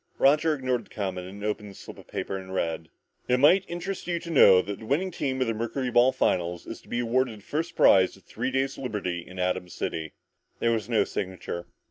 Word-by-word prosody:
Roger 150 +3 +4
ignored 130 -4 -1
the - - -24
comment 95 -3 -4
and 100 +2 -9
opened 105 -1 -2
the 100 - -12
slip - - -11
of - - -15
paper 95 - -4
to 95 - -11
read: 80 -3 -2 0.2
"... - - -43
It 125 0 +3
might 180 +8 +6
interest 175 +3 -5
you 175 -1 0
to 170 0 -7
know 100 - +8
that 100 -1 -5
the 110 - -10
winning 180 +9 +1
team 135 -5 -2
of - - +3
the 115 - 0
mercuryball 120 +2 +2
finals 90 -9 0
is - - -8
to - - -20
be 120 - -1
awarded 120 -1 0
a - - -15
first 165 +7 -3
prize 95 0 +5
of 95 - -21
three 125 +4 -3
days' 135 +1 -1
liberty 105 -9 -3
in 90 +2 -11
Atom 90 0 -1
City...." 80 -2 -4 0.4
There 115 - +1
was 110 -1 -1
no 115 -3 +3
signature. 90 -2 -5
115 Hz, 225 wpm, -27 LUFS, 95-135 Hz, 0.4 s, know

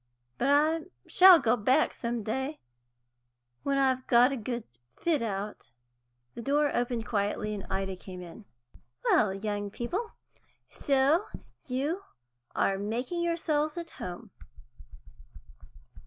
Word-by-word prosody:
But 265 - +1
I 310 +3 +3 0.2
shall 370 -1 +9
go 240 -6 +2
back 255 +7 +2
some 235 -2 -3
day, 265 +8 -3 1.0
when 275 0 0
I've 260 -1 +1
got 245 +2 +5
a - - -1
good 240 0 -4 0.4
fit 320 -6 +1
out." 205 -2 -4 0.6
The - - -7
door 290 +3 +1
opened 240 -2 -1
quietly, 210 0 -1
and 200 -2 -6
Ida 195 0 -2
came 180 0 -9
in. 180 +5 -12 0.6
"Well, 210 -3 +4
young 205 +1 -3
people, 350 - -4 0.6
so 275 +4 +2 0.4
you 285 +9 -1 0.5
are 195 0 +1
making 245 - -2
yourselves 315 -2 0
at 335 -1 -6
home." 180 -1 -7
250 Hz, 120 wpm, -29 LUFS, 210-295 Hz, 1.0 s, shall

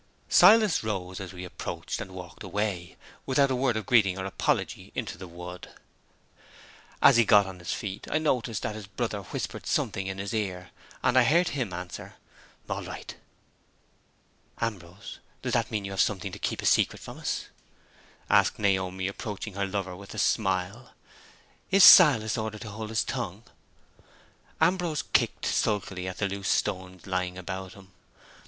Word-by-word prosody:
Silas 210 - +6
rose 95 -4 -3
as 95 -2 -7
we 90 -1 -8
approached, 90 - -5
and - - -6
walked 90 -2 -10
away, 100 -4 -3 0.3
without 135 +1 +3
a - - +1
word 125 -3 +1
of 110 - -4
greeting 105 -8 +4
or 95 - -4
apology, 95 - -2
into - - -3
the 95 +1 -9
wood. 90 +1 -9 1.3
As - - +8
he 120 - +6
got 105 -2 +6
on 95 -1 -8
his 85 - -5
feet, 100 -1 -5
I - - +1
noticed 125 -8 -1
that 110 - -2
his 105 -2 -8
brother 105 0 -3
whispered 90 - -6
something 95 -1 -1
in 95 0 -4
his 100 0 -4
ear; 95 -4 -3 0.3
and 130 - +4
I - - +6
heard 170 +8 +3
him 130 -9 -3
answer, 90 0 -7 0.5
"All - - -3
right." - - -8 1.4
"Ambrose, 95 -5 -5 0.2
does - - -2
that - - +1
mean 105 -2 -3
you 100 - -5
have 95 - +1
something 100 -1 -1
to - - -8
keep - - -2
a - - -3
secret - - +3
from - - -10
us?" - - -3 0.8
asked - - +3
Naomi, 95 -2 0
approaching 105 +1 -5
her 100 0 -2
lover 95 -2 -3
with 100 +3 -11
a - - -8
smile. 100 +3 -1 0.7
"Is 195 0 +6
Silas 120 - +8
ordered 110 -1 -4
to 110 -3 -7
hold 110 +1 -6
his 110 0 +1
tongue?" 110 -5 -4 1.2
Ambrose 170 -2 +1
kicked - - +2
sulkily 95 -3 -1
at 95 -1 -5
the 100 - 0
loose 100 0 -4
stones 95 -3 -1
lying 90 -1 -2
about 95 0 -6
him. 95 -1 -16
100 Hz, 165 wpm, -27 LUFS, 95-115 Hz, 1.4 s, As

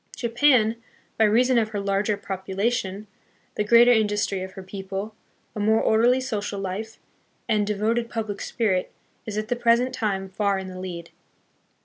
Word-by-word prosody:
Japan, 235 -2 +3 0.4
by 220 - +6
reason 240 +4 +4
of 220 -1 0
her 210 -2 -3
larger 200 +1 0
population, 195 +1 -3 0.5
the 210 - -1
greater 235 +3 +6
industry 205 -4 +1
of 190 0 -7
her 190 - -9
people, 195 +2 -6 0.4
a - - -4
more 220 +2 +3
orderly 240 +4 +3
social 210 -5 -3
life, 195 +4 -5 0.5
and 210 -3 +1
devoted 225 +3 0
public 220 -3 -4
spirit, 190 -6 -1 0.4
is 210 -1 -4
at 215 0 -2
the 245 - +1
present 240 +1 +2
time 195 -4 -2
far 200 +1 0
in 190 0 -5
the 185 0 -8
lead. 175 -2 -7
210 Hz, 155 wpm, -24 LUFS, 195-230 Hz, 0.5 s, by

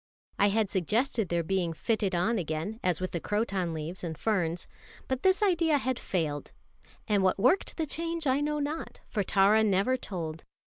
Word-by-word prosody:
I 200 - +5
had 210 +1 +2
suggested 210 - 0
their 170 -1 +1
being 175 -1 0
fitted 205 0 0
on 215 +6 +1
again, 165 +6 -3
as 180 -3 +1
with 185 0 -3
the 170 - -2
croton 195 -3 -1
leaves 160 +3 -5
and 160 -3 -4
ferns. 175 -6 0 0.4
But 260 0 -1
this 380 +2 +3
idea 335 -6 +3
had 260 -2 -1
failed; 155 -5 -2 0.5
and 205 -2 +3
what 185 -1 +2
worked 255 - +2
the 320 - 0
change 330 +1 -3
I 270 +1 +2
know 300 0 0
not, 295 +2 -4
for 210 - -1
Tara 200 +3 +4
never 205 +5 +2
told. 165 -8 -5
205 Hz, 180 wpm, -29 LUFS, 175-260 Hz, 0.5 s, I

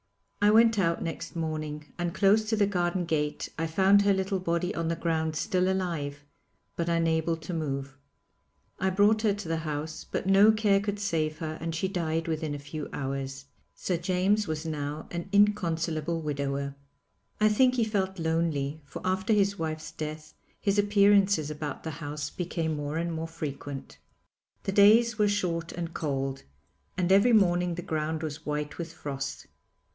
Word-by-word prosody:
I 205 - +6
went 225 0 +5
out 170 -3 +1
next 170 +1 -5
morning, 155 -2 -3
and 175 -1 -2
close 210 +2 +4
to 225 - +2
the 210 -1 +3
garden 180 -2 0
gate 150 -2 -1
I 165 - 0
found 195 +5 +5
her 200 0 +4
little 190 0 -1
body 175 +1 -1
on 165 0 -2
the 165 - 0
ground 160 -1 -1
still 185 +2 +1
alive, 150 -6 -3 0.5
but 170 0 -1
unable 165 0 +1
to 160 +2 -7
move. 140 -4 -3 0.8
I 190 - +2
brought 205 +3 +4
her 210 -3 +2
to 205 -4 -7
the 165 0 0
house, 155 0 -4
but - - -4
no 195 +3 +7
care 210 -2 +3
could 205 0 -3
save 155 -6 -1
her 155 -1 -5
and 165 0 -3
she 175 +4 0
died 165 -3 -1
within 155 -2 -2
a - - -6
few 150 +1 -6
hours. 135 0 -4 0.3
Sir 180 - -1
James 185 +4 +1
was 155 0 -3
now 150 -1 -4
an 175 +2 -5
inconsolable 170 -6 +2
widower. 140 -2 -2 0.7
I 215 - +5
think 250 +4 +4
he 240 - +2
felt 195 -3 -1
lonely, 160 -3 -1
for 140 - -9
after 190 +3 +1
his 200 -1 +2
wife's 155 -1 -4
death 155 0 -6 0.3
his 200 0 +1
appearances 200 -5 +4
about 150 -1 -5
the 160 - -4
house 150 0 -4
became 165 -3 -2
more 145 +1 -3
and 170 0 -1
more 160 0 -3
frequent. 145 -3 -6 0.6
The - - -1
days 220 +3 +5
were 210 - +4
short 170 -5 -1
and 170 -1 -5
cold, 135 -3 -2 0.6
and 180 0 +1
every 200 +5 +6
morning 175 -4 +3
the 175 - -5
ground 155 0 -2
was 155 0 -6
white 150 +1 -3
with 165 -1 -4
frost. 140 -4 -5
165 Hz, 170 wpm, -28 LUFS, 155-195 Hz, 0.8 s, no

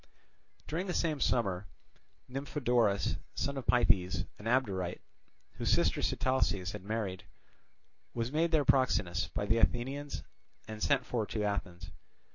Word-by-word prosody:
During 170 +5 -2
the 180 - -2
same 155 -3 +1
summer 100 -8 +1 0.6
Nymphodorus, 125 -6 +1 0.2
son 140 - -1
of 135 - -5
Pythes, 105 -7 +3
an 105 - -11
Abderite, 100 -8 0 0.5
whose - - -1
sister - - +3
Sitalces 100 -9 +1
had 105 -3 -7
married, 100 -4 -3 0.9
was 115 +1 -1
made 160 +3 +2
their 155 -3 +3
proxenus 95 -8 +2
by 100 - 0
the 110 +2 +2
Athenians 135 +5 0 0.4
and 110 -1 -7
sent 135 -3 +2
for 115 -4 -1
to 105 - -2
Athens. 100 -4 -3
115 Hz, 130 wpm, -32 LUFS, 100-135 Hz, 0.9 s, Pythes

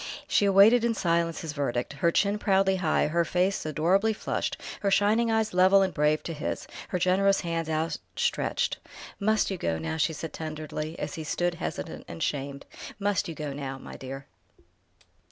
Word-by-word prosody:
She 205 - +3
awaited 200 +5 +6
in 235 -1 +1
silence 170 -3 0
his 160 -3 -5
verdict, 135 -3 -2
her 165 +4 +1
chin 200 +3 +1
proudly 195 -2 +3
high, 165 -4 +2
her 170 +3 +1
face 180 +1 0
adorably 185 +8 +2
flushed, - - -3 0.2
her 200 - 0
shining 210 +4 +3
eyes 220 -2 +1
level 190 +2 +6
and 190 -2 -1
brave 150 +1 +2
to 165 - -4
his, 150 - -4 0.2
her - - -1
generous 195 +2 +3
hands 165 -2 -2
outstretched. 160 +1 -1 0.4
"Must 215 0 +2
you 190 - -3
go 80 -1 -1
now?" 80 0 -3
she 160 - +1
said 160 +1 -6
tenderly, 155 0 -5
as 150 - -4
he 160 - -5
stood 175 +3 0
hesitant 170 - -5
and 85 - -5
shamed. 140 -1 -3 0.3
"Must 205 0 0
you 165 - -6
go 150 -2 -4
now, 135 -1 -5
my - - -10
dear?" 135 +1 -7
170 Hz, 175 wpm, -27 LUFS, 150-195 Hz, 0.4 s, awaited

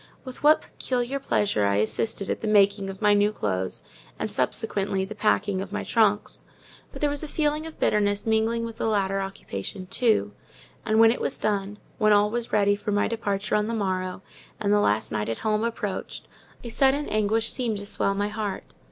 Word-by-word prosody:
With 255 -1 -9
what 305 +1 +5
peculiar 255 +2 -2
pleasure 205 - +1
I 100 - +2
assisted 195 - -1
at - - -3
the 220 - -2
making 200 -1 +3
of 195 +2 -8
my 210 0 +6
new 205 +1 +3
clothes, 95 - -2 0.3
and, - - -3
subsequently, 195 -3 0
the 205 - -7
packing 205 -2 +1
of 195 0 -7
my 210 - -3
trunks! 210 -3 +1 0.5
But - - -10
there 295 - +3
was 285 - -4
a 310 - -5
feeling 300 +1 0
of 320 - -11
bitterness 205 -1 +1
mingling 225 +1 +1
with 230 -1 -7
the - - -1
latter 195 -2 +1
occupation 185 - -6
too; 220 +4 +1 0.5
and 220 0 +3
when 225 0 +7
it 240 - -3
was - - -1
done—when 210 +1 -1
all 205 0 +4
was 235 0 -3
ready 205 -1 +3
for 205 +1 -4
my 205 0 +2
departure 205 -2 -2
on 210 0 +2
the 230 - -2
morrow, 185 -2 -2 0.4
and 205 -1 +1
the 210 - +4
last 110 - +1
night 105 0 -2
at 115 - -2
home 215 0 +1
approached—a 230 +1 -6
sudden 275 +4 +2
anguish 215 +1 +1
seemed 235 -5 -1
to 200 - -6
swell 200 -1 0
my 205 +1 -1
heart. 210 -2 -4
210 Hz, 195 wpm, -25 LUFS, 195-225 Hz, 0.5 s, when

